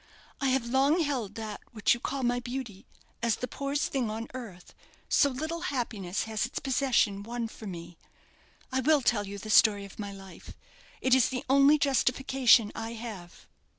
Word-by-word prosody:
I 275 - +2
have 260 -2 +1
long 270 +7 +3
held 255 -10 -2
that 215 -2 -6
which 220 -3 +3
you 240 - -4
call 270 +2 -3
my 245 0 +1
beauty 245 -4 -6 0.3
as 235 -1 +2
the 250 - -4
poorest 280 +4 -2
thing 255 -5 -1
on 225 +2 -5
earth, 215 -9 -9 0.3
so 285 - +4
little, 315 +6 -4
happiness 210 -8 -2
has 220 -2 -2
its - - -9
possession 255 -7 +1
won 235 +2 -4
for 220 -1 -10
me. 170 -2 -8 0.7
I 260 - +1
will 290 +1 +3
tell 205 -4 +1
you 200 +1 -6
the 215 +2 -6
story 205 -2 +5
of 200 - -14
my 205 -1 -4
life. 195 -1 -12 0.5
It 260 - +3
is 260 -2 +5
the 260 +1 -4
only 275 +3 +6
justification 265 -4 +3
I 225 +1 -5
have." 215 -7 -9
240 Hz, 180 wpm, -29 LUFS, 210-265 Hz, 0.7 s, only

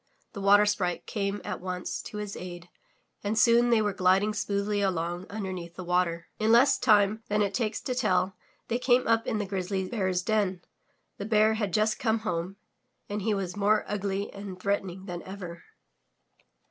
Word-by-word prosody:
The 200 - -6
Water 205 +1 +6
Sprite 190 -4 -1
came 200 -1 -2
at - - -4
once 180 -1 -4
to 210 - -8
his 210 -1 -5
aid 175 0 -8 0.5
and 210 +2 -1
soon 235 +2 +5
they 230 -2 +4
were 205 -1 0
gliding 190 +3 +3
smoothly 205 0 -1
along 175 -1 -1
imdemeath 185 -4 -5
the 185 - -6
water. 175 -1 0
In 220 +1 +2
less 240 +4 +5
time 210 0 +4
than 210 -1 +2
it 200 -1 -1
takes 220 0 -1
to 255 - -2
tell 190 -6 +1 0.3
they 235 - -1
came 250 0 +3
up 225 0 +2
in - - 0
the 205 - -1
Grizzly 190 0 -2
Bear's 185 -5 -1
den. 195 -4 0 0.5
The 200 - -5
Bear 215 0 +4
had 210 -3 -2
just 215 +3 +1
come 220 -1 +1
home 180 -2 -3 0.5
and 205 +1 -3
he 215 +1 +1
was 190 -2 -3
more 205 +1 +2
ugly 200 -1 -2
and 200 -2 -8
threatening 190 -1 -2
than 175 -3 -5
ever. 180 -3 -8
200 Hz, 180 wpm, -28 LUFS, 185-215 Hz, 0.5 s, Water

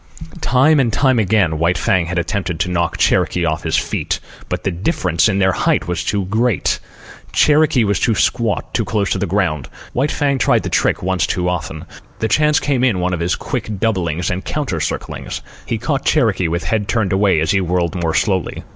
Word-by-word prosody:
Time 135 +5 +4
and 120 -4 +1 0.2
again 95 -6 +2
White 85 +2 +2
Fang 90 -3 +1
had 90 +1 -3
attempted 90 -1 -2
to 90 - -1
knock 85 -1 0
Cherokee 90 -1 +2
off 80 -1 -1
his - - 0
feet; - - -2 0.3
but 90 0 -3
the 95 - 0
difference 90 - +1
in 100 - 0
their 95 -1 +3
height - - 0
was 90 - -2
too 100 -2 -1
great. 110 +2 0 0.5
Cherokee 150 -4 +4
was 100 -2 +1
too 115 - +2
squat, 105 +1 0
too - - +1
close 100 -4 -1
to - - 0
the - - -1
ground. 85 -7 -1 0.2
White 135 +4 +1
Fang 140 -2 0
tried - - +2
the - - -3
trick - - +1
once 95 -4 0
too 90 0 -1
often. 80 -3 -3 0.3
The 110 - -1
chance 150 +4 +3
came 135 -3 0
in 115 -8 +2
one 90 +1 0
of 90 - -2
his 85 +1 0
quick 105 -2 -4
doublings 90 -6 -1
and 95 +1 -3
counter 140 - -2
circlings. - - -4 0.2
He 115 - -1
caught 135 +4 -2
Cherokee 105 - +2
with 85 +2 -2
head 105 -3 -1
turned 105 -5 0
away 95 -4 +3
as 80 0 +1
he 95 - +2
whirled 90 -1 0
more 85 -3 -1
slowly. 95 -5 0
95 Hz, 200 wpm, -18 LUFS, 90-115 Hz, 0.5 s, Time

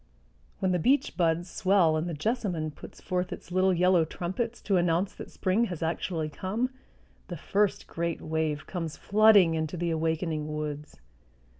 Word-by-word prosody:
When 190 - 0
the 180 - +1
beech 270 - +2
buds 170 0 +1
swell 185 -3 +3
and 160 +3 -1
the 165 - -3
jessamine 180 - -1
puts - - -12
forth 180 0 -2
its - - -8
little 185 +1 +3
yellow 180 -1 +4
trumpets 190 +9 -4
to 195 -3 +1
announce 175 +2 +1
that - - -9
spring 195 +5 +1
has 175 -6 -5
actually 165 0 -2
come, 200 - -2 0.6
the 175 - -6
first 200 +6 0
great 170 0 -3
wave 155 -1 -2
comes 165 -4 -5
flooding 205 -5 +5
into 160 +2 -2
the 170 0 -1
awakening 160 -1 -1
woods. 150 -1 -5
175 Hz, 160 wpm, -28 LUFS, 160-190 Hz, 0.6 s, flooding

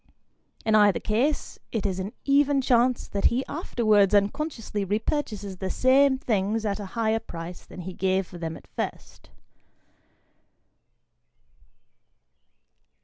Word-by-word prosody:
In 220 - +2
either 205 -2 +5
case, 245 +8 -1
it 220 -3 -2
is 190 -2 -1
an 190 +3 -4
even 280 0 +3
chance 250 -1 +2
that 200 - -2
he 255 +3 +2
afterwards 215 - +2
unconsciously 225 0 -1
repurchases 205 -2 -2
the 190 - -3
same 265 +3 +4
things 220 -2 -1
at 205 0 -1
a 205 - -5
higher 225 -1 +2
price 175 -4 -8
than 180 - -9
he 185 +1 -6
gave 190 +1 0
for 175 -1 -11
them 165 -1 -4
at - - -16
first. - - -6
215 Hz, 125 wpm, -26 LUFS, 195-255 Hz, -, either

